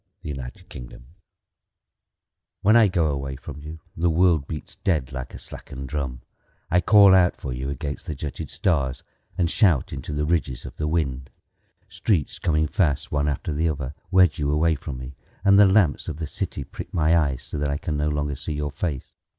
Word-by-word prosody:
The 75 - -4
Taxi 65 -1 -8 1.8
When 110 +3 +5
I 115 -2 +7
go 90 -3 +1
away 70 -1 -4
from 75 +1 -9
you 80 +2 -9
The 85 +1 +1
world 80 -3 +3
beats 75 -2 -7
dead 75 -9 0
Like 65 -2 -6
a - - -7
slackened 65 0 -8
drum. 65 -5 -4 0.5
I 90 +2 +4
call 100 +1 +7
out 90 -2 +5
for 65 - -4
you 65 +2 -4
against 70 0 -5
the 75 - -3
jutted 70 0 -5
stars 70 -7 0 0.3
And 85 - +2
shout 85 - +2
into 70 +2 -6
the 75 0 -1
ridges 75 -6 -1
of - - -9
the 75 - -1
wind. 70 -5 -1 0.6
Streets 90 -10 -1
coming 75 -1 +2
fast, 75 -2 0
One 75 0 +1
after 75 +2 -2
the 80 +3 +1
other, 70 -2 -4 0.2
Wedge 90 -5 +4
you 70 -1 0
away 80 +2 +3
from 70 -2 -6
me, 65 +2 -8 0.3
And 100 0 +7
the 105 - +8
lamps 95 -6 +3
of 80 -3 -4
the 80 - -3
city 70 -1 -4
prick - - -9
my 80 -1 +3
eyes 70 -6 +1
So 75 - -5
that 75 0 0
I 70 - 0
can 75 0 -3
no 75 +1 0
longer 75 -1 -1
see 75 - -5
your 75 0 -3
face. 75 -2 -4
75 Hz, 195 wpm, -24 LUFS, 70-85 Hz, 1.8 s, the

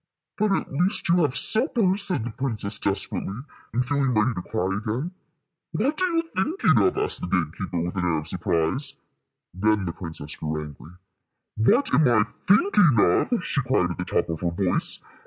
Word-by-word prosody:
"But 210 0 +2
at 195 - -1
least 180 +8 0
you 170 - +4
have 145 -5 +1
suppers," 215 - +2
said 180 - +2
the 120 - -4
princess, 110 -5 -2
desperately, 100 +3 -2 0.3
and 125 +2 0
feeling 135 -2 0
ready 110 +4 +2
to 90 - -5
cry 95 +2 -2
again. 115 +11 -3 0.6
"What 300 +5 -1
are 370 - +2
you 330 -1 +1
thinking 310 - +2
of?" 375 - +2
asked 420 +1 -1
the - - -3
gate 85 -4 0
keeper, 95 -3 -4
with 90 +3 -4
an 90 -2 -1
air 85 -2 +1
of 75 0 -5
surprise. 85 - 0 0.6
Then 105 +2 +1
the 85 - -3
princess 80 -4 -6
grew 75 0 -3
angry. 75 +2 -10 0.6
"What 230 - +3
am 155 - +5
I 115 -3 +4 0.2
thinking 205 - +4
of?" 180 - +2
she 140 - 0
cried, 120 -8 +1
at - - -6
the 90 - -2
top 90 - 0
of 80 -1 -3
her 85 - 0
voice. 90 +1 0
115 Hz, 190 wpm, -24 LUFS, -, 0.6 s, am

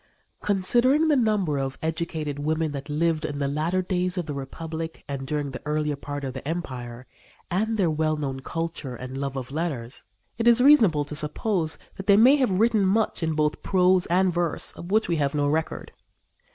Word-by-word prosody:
Considering 240 +10 +3
the 300 - +4
number 210 - +1
of 135 0 -3
educated 160 -2 -3
women 155 +1 0
that 140 0 -6
lived 160 +1 0
in 150 -2 -3
the 140 -1 -1
latter 160 +6 0
days 180 0 -1
of 175 - -1
the 150 - -4
Republic 160 +4 -6
and 135 -1 -5
during 145 -2 -2
the 130 - -7
earlier 150 0 -1
part 145 0 -6
of 130 -2 -4
the 130 +1 -7
Empire, 130 -7 -5 0.5
and 220 +5 0
their 180 -6 +2
well 155 0 0
known 135 -3 -3
culture 165 -3 -4
and 130 +1 -7
love 140 -1 -3
of 130 -1 -5
letters, 140 -6 -4 0.3
it 230 - +1
is 235 0 +6
reasonable 225 - +5
to 145 - -8
suppose 160 +3 -1 0.2
that 190 - -7
they 200 -1 +6
may 250 +6 +7
have 245 -10 +1
written 225 -2 +3
much 210 +2 +1
in 160 -1 0
both 150 0 0
prose 185 -1 +3
and 180 +1 +2
verse 170 -2 -1
of 170 - -10
which 215 +2 +2
we 170 - 0
have 140 -1 0
no 145 -1 +1
record. 160 +2 -2
160 Hz, 195 wpm, -25 LUFS, 145-185 Hz, 0.5 s, may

